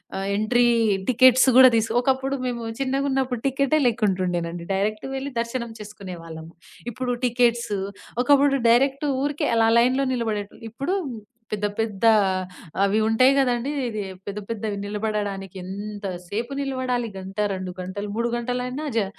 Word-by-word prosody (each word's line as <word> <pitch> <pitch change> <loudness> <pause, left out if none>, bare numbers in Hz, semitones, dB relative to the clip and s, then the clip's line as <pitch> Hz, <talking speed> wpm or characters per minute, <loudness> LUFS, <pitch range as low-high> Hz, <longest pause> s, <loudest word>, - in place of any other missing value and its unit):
ఆహ్, 195 0 -3
entry 240 +4 +2 0.4
tickets 255 +1 +6
గూడా 260 0 +10
these 225 0 0
ఒకప్పుడు 265 +2 0
మేము 240 -2 -3 0.2
చిన్నగున్నప్పుడు 265 -2 0
టికెట్టే 275 +3 +2
లేక్కుంటుండేనండి 180 -6 -1
డైరెక్ట్ 210 +5 -1
వెళ్లి 270 +1 -4
దర్శనం 235 0 -3
చేసుకునేవాళ్ళం. 175 -6 -9 0.4
ఇప్పుడు 250 +2 -2
టికెట్స్ 240 -2 +1 0.5
ఒకప్పుడు 280 0 +4
డైరెక్ట్ 275 +4 +3 0.2
ఊరికే 290 0 -1
అలా 225 0 +4
లైన్‌లో 255 +3 +2
నిలబడేటోల్ 220 -4 -3
ఇప్పుడు 275 - -2 0.6
పెద్ద 210 -1 -1
పెద్ద 220 -1 -1 0.8
అవి 200 +2 +2
ఉంటాయి 255 +5 +5
గదండీ! 250 0 +1 0.2
ఇదీ 215 -2 -4 0.2
పెద్ద 200 +1 -5
పెద్దవి 215 -2 -3
నిలబడడానికి 205 -2 -3
ఎంత 200 +2 -6 0.2
సేపు 230 +8 -4
నిలబడాలి. 255 -3 -1
గంట, 190 +1 -9 0.2
2 185 -1 -5
గంటలు 190 +3 -5
3 235 +1 0
గంటలయినా 250 +4 -3
జ 220 -3 +2
230 Hz, 130 wpm, -24 LUFS, 205-260 Hz, 0.8 s, గూడా